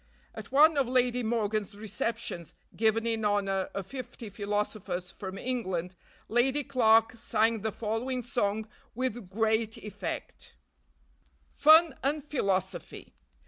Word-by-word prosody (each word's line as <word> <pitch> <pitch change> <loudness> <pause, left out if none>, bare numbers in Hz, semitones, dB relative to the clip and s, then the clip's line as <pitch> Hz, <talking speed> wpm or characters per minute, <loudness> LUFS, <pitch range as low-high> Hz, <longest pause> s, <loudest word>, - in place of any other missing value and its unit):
At - - -9
one 300 +2 +6
of 270 -3 +2
Lady 250 0 +2
Morgan's 215 -3 -1
receptions, 215 -4 -4 0.2
given 225 +1 +2
in 225 -1 0
honor 195 -2 +1
of 195 -1 -3
fifty 240 -2 -8
philosophers 200 -3 -3
from 190 -1 -7
England, 190 -7 -2 0.3
Lady 260 +5 +2
Clarke 225 -5 +4
sang 225 -1 +1
the 220 +1 -1
following 235 +4 -2
song 220 -2 -1 0.3
with 240 -5 -3
"great 220 +2 0
effect:" 205 -1 -6 1.0
FUN 315 0 +6
AND 290 +2 0
PHILOSOPHY. 190 - -2
220 Hz, 115 wpm, -29 LUFS, 200-245 Hz, 1.0 s, one